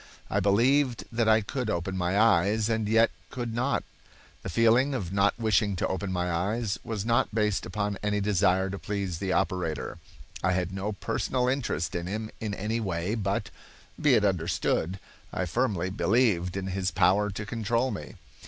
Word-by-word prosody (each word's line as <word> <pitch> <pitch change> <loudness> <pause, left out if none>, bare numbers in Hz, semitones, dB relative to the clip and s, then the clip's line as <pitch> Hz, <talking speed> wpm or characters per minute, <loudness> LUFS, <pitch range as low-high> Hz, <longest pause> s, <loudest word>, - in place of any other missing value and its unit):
I 100 - +2
believed 120 +6 +3
that 115 -1 +1
I 110 0 +5
could 125 +2 -3
open 85 +1 -2
my 90 +2 +1
eyes, 110 +1 +3
and 110 -2 0
yet 115 +1 +4 0.2
could 120 -2 -4
not. 125 +4 0 0.6
The - - -5
feeling 115 +8 +3
of 95 -7 -4
not 100 +1 +2
wishing 110 -3 +2
to - - -1
open 95 +1 -3
my 90 -1 -1
eyes 100 +4 -1
was 110 -3 -4
not 115 -1 +1
based 105 -4 +1
upon 100 +2 -2
any 105 0 0
desire 95 -1 +2
to 100 - -5
please 100 -5 -3
the 95 -2 -2
operator. 85 -4 -1 0.4
I 95 0 +3
had 90 0 -1
no 100 +2 -3
personal 125 +5 -1
interest 125 - -1
in 85 0 -3
him 110 +3 -4
in 105 -2 -3
any 110 +4 -2
way, 90 -2 -2
but, 100 -3 -2 0.5
be 145 -4 +5
it 105 - +3
understood, 85 0 0 0.3
I 95 - -1
firmly 95 -3 0
believed 100 -4 +2
in 95 - -3
his 95 0 -1
power 100 +2 +3
to 105 +1 -5
control 115 +4 0
me. - - -7
100 Hz, 175 wpm, -28 LUFS, 95-115 Hz, 0.6 s, I